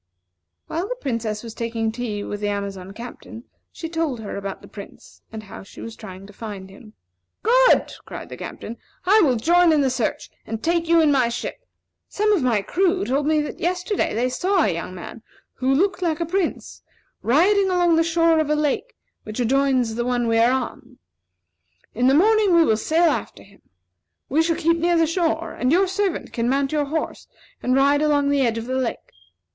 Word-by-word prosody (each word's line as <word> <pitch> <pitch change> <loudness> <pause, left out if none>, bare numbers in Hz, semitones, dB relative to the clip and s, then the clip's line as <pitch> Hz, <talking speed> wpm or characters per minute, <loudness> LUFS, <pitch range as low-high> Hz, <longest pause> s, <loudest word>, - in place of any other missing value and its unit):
"While 340 +5 -3
the - - -2
Princess 230 - -3
was 230 -2 -8
taking 225 -1 -2
tea 220 -3 -4
with 205 - -5
the 205 - -1
Amazon 200 -2 -4
Captain, 235 +1 -10 0.3
she 325 - -6
told 325 -6 -2
her 215 - -6
about 195 -1 -6
the - - -12
Prince, 200 -2 -13
and 220 -1 -7
how 195 - -10
she 195 - -14
was 230 -1 -7
trying 190 -2 -10
to 205 - -14
find 200 -3 -8
him. 215 +2 -15 0.5
"Good!" - - +4
cried - - -9
the - - -7
Captain. 230 +2 -8 0.3
"I 420 +4 +5
will 275 -8 +3
join 345 +8 +4
in 305 -2 +3
the 265 -2 +1
search, 245 -4 -2 0.2
and 225 0 -5
take 335 0 +1
you 335 -1 +5
in 305 -2 +4
my 255 -4 +3
ship. - - -6 0.4
Some 425 +1 +1
of 380 - +2
my 230 -6 +1
crew 375 - +1
told 280 +3 0
me 310 -1 +3
that 295 - -6
yesterday 360 - -1
they 240 +3 +1
saw 360 +8 +1
a 190 - +1
young 170 +2 -6
man, 200 +5 -9 0.3
who 260 +1 -1
looked 375 +7 +1
like 330 -3 0
a 335 - 0
prince, 365 +1 -3 0.4
riding 380 - +3
along 350 -2 +3
the 330 - +4
shore 330 0 +3
of 310 -2 0
a 300 - +3
lake 300 - -1 0.3
which 215 +2 -7
adjoins 255 -1 +2
the 240 +2 -2
one 245 -1 0
we 225 0 +2
are 235 +2 +5
on. 255 -1 -4 1.0
In 245 +3 +1
the 270 - +5
morning 420 +2 +4
we 335 - +6
will 220 - +3
sail 320 +8 +2
after - - -5
him. 200 0 -21 0.7
We 300 +5 +3
shall 330 0 +1
keep 335 +2 +2
near 345 +1 +2
the 330 - +4
shore, 330 0 -1
and 250 +2 0
your 370 +4 +4
servant 385 -1 -2
can 235 0 0
mount 275 +1 +1
your 300 -1 0
horse 315 +3 -4 0.3
and 255 +1 +1
ride 280 +2 +4
along 290 -2 +2
the 285 -1 +2
edge 230 -3 +1
of 225 - -4
the 255 - -4
lake. 250 -3 -4
275 Hz, 205 wpm, -22 LUFS, 230-335 Hz, 1.0 s, we